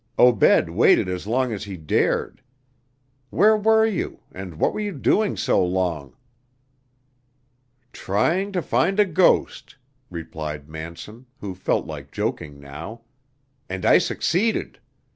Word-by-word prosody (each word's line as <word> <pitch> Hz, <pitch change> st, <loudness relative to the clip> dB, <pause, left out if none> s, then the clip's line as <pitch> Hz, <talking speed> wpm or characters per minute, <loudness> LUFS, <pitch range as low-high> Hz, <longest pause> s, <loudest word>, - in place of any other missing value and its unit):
Obed 125 Hz, -4 st, +5 dB
waited -, -, +3 dB
as 90 Hz, +1 st, -4 dB
long 125 Hz, +1 st, 0 dB
as 105 Hz, -1 st, -5 dB
he 100 Hz, -2 st, -7 dB
dared. 80 Hz, -2 st, -1 dB, 0.9 s
Where 210 Hz, +9 st, +4 dB
were 220 Hz, +1 st, +4 dB
you, 220 Hz, -5 st, -3 dB
and 95 Hz, -3 st, -8 dB
what -, -, +1 dB
were -, -, -4 dB
you 205 Hz, -2 st, -3 dB
doing 205 Hz, +8 st, +1 dB
so -, -, +2 dB
long?" 90 Hz, -7 st, -2 dB, 1.8 s
"Trying 170 Hz, -, 0 dB
to 180 Hz, -3 st, -1 dB
find 165 Hz, -, +1 dB
a 210 Hz, -, +6 dB
ghost," 175 Hz, -5 st, +1 dB, 0.3 s
replied 75 Hz, -4 st, -6 dB
Manson, 85 Hz, +10 st, -9 dB
who 100 Hz, -2 st, -5 dB
felt 90 Hz, -, -1 dB
like -, -, -8 dB
joking 70 Hz, -1 st, -4 dB
now, 75 Hz, +12 st, -9 dB, 0.7 s
"and 95 Hz, -1 st, -4 dB
I -, -, +6 dB
succeeded. 215 Hz, +7 st, -1 dB
105 Hz, 125 wpm, -23 LUFS, -, 1.8 s, a